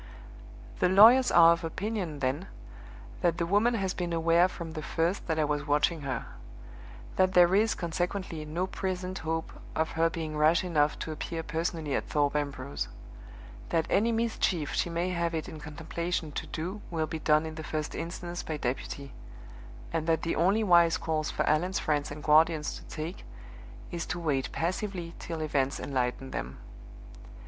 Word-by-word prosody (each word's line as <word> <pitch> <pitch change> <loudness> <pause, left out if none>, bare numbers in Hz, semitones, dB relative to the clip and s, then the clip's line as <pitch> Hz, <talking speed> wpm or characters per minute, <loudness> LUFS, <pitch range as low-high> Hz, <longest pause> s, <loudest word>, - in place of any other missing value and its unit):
"The 180 - +3
lawyers 225 +7 +8
are 170 -1 +8
of 170 - -5
opinion, 180 -3 -3
then, 140 +8 -1 0.7
that 170 -2 +2
the 170 - 0
woman 210 +7 +3
has 190 -4 -1
been 175 -2 -3
aware 165 +2 +4
from 170 -3 -7
the 155 -1 -5
first 165 +5 -1
that 160 -2 0
I 155 - +2
was 145 0 -2
watching 150 +3 +2
her; 135 -2 -3 0.9
that 185 0 +3
there 175 0 +6
is, 220 +3 +3
consequently, 175 -1 -3
no 160 +4 -2
present 185 0 -3
hope 160 0 -3 0.2
of 160 0 0
her 165 +1 +2
being 160 -2 -4
rash 155 +3 +4
enough 150 -4 +1
to 160 - -5
appear 165 +1 -4
personally 160 -2 -2
at - - -1
Thorpe 145 -1 +1
Ambrose; 140 -2 -2 0.8
that 165 -1 +1
any 225 +4 +3
mischief 225 -9 0
she - - 0
may 170 +2 -1
have 170 -2 -1
it 160 - -3
in 160 -4 -8
contemplation 160 +2 -4
to - - -5
do 185 +6 -5
will 160 -2 -1
be 160 0 -5
done 155 0 +3
in 160 - -5
the 160 0 -7
first 155 -1 -3
instance 175 +1 -5
by 155 - -4
deputy; 135 +1 -4 0.8
and 160 -1 -1
that 160 -1 +2
the 165 - 0
only 195 +7 +3
wise 170 -4 +5
course 155 -1 -1
for - - -1
Allan's 175 +5 +2
friends 150 -1 0
and 150 0 -8
guardians 155 0 +4
to - - -14
take 160 +3 -6 0.7
is 170 -1 -4
to 175 - -3
wait 145 -6 -1
passively 175 0 -3
till 165 -2 -5
events 140 -3 0
enlighten 130 0 -2
them. 65 +2 -5
165 Hz, 175 wpm, -29 LUFS, 155-180 Hz, 0.9 s, lawyers